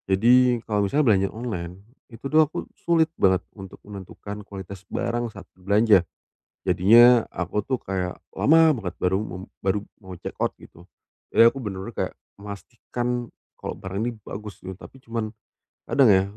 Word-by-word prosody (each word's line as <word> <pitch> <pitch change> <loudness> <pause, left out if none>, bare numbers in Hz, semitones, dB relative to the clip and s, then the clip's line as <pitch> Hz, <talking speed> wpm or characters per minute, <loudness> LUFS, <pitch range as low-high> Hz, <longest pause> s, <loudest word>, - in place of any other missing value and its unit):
Jadi 125 +3 +5
kalau 105 -2 +1
misalnya 150 +8 +2
belanja 95 -3 +4
online, 100 -7 -5 0.4
itu 115 - -13
tuh 155 +3 +5
aku 150 - -6
sulit 165 -2 +2
banget 95 -1 +3 0.2
untuk 95 -3 -11
menentukan 100 +1 -8
kualitas 95 -1 -9
barang 120 0 -2
saat 95 -2 -12
berbelanja. 100 +1 +4 0.6
Jadinya 120 +5 +7
aku 95 +4 -2
tuh 130 +4 -2
kayak 90 -3 -3 0.2
lama 160 +1 +5
banget 95 -9 -5
baru 90 +1 +1
mu 100 - -6 0.3
baru 95 +2 +1 0.2
mau 95 -2 -9
check - - -7
out - - +2
gitu. 85 - -16 0.5
Jadi 115 - +7
aku 125 +4 +3
bener-bener 95 -3 -6
kayak - - -3 0.2
memastikan 120 +4 -5 0.2
kalau - - -6
barang 95 +1 -5
ini 120 - 0 0.2
bagus 105 0 -8
nih, 95 - -5
tapi 115 +7 -14
cuman 115 -4 -4 0.6
kadang 135 -4 +4
ya 95 -2 +6
105 Hz, 160 wpm, -24 LUFS, 95-120 Hz, 0.6 s, Jadinya